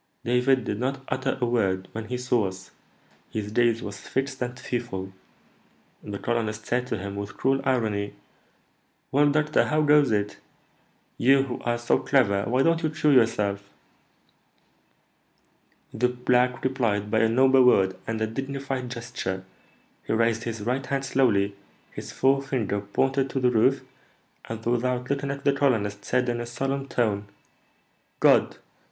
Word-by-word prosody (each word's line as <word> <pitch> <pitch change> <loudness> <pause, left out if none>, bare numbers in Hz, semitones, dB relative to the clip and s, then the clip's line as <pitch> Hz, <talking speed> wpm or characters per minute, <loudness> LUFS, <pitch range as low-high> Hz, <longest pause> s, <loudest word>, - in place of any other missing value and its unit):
David 125 +2 +2
did 105 -1 -3
not 135 +2 -2
utter 130 +1 -1
a 125 - +1
word 95 -6 0
when 110 0 -6
he 125 - -3
saw 125 -4 +1
us; 95 0 -9 0.6
his 105 -1 -4
gaze 115 0 +2
was 105 - -7
fixed 135 0 -3
and 125 0 -3
fearful. 105 -7 -4 0.9
The 100 -1 -6
colonist 110 -1 -2
said 125 +1 -1
to 115 - -2
him, 100 +1 -6
with 100 0 -6
cruel 135 +1 +1
irony, 110 -6 0 1.0
'Well, 145 +2 +4
doctor, 150 +1 +2
how 155 0 +1
goes 145 -3 +5
it? 105 -1 -1 0.8
You, 135 +2 +5
who 130 -2 -5
are 120 0 +1
so 120 0 +1
clever, 100 -8 +2
why 125 +3 +2
don't 165 +1 +2
you 160 - 0
cure 150 -1 +2
yourself?' 100 -5 +2 2.2
The 125 +2 +1
black 125 0 +1
replied 115 -6 0
by 110 - +3
a 115 0 +3
noble 130 +2 +5
word 95 -6 +4
and 115 0 -2
a - - +3
dignified 135 +2 -4
gesture; 115 -6 -5 0.6
he - - 0
raised 115 0 +1
his 115 -2 -4
right 125 +5 -1
hand 135 0 -2
slowly, 100 -8 +2 0.4
his - - -8
forefinger 130 -7 0
pointed 135 +6 0
to 135 - -2
the 125 -1 +3
roof, 125 +4 +3 0.6
and, 115 0 -7
without 125 +2 0
looking 140 0 -1
at 140 0 -5
the 140 - +4
colonist, 110 -8 0
said 125 0 0
in 120 0 -1
a 120 - -5
solemn 135 +3 -3
tone, 105 -6 -1 0.9
'God!' - - +4
125 Hz, 155 wpm, -25 LUFS, 110-135 Hz, 2.2 s, goes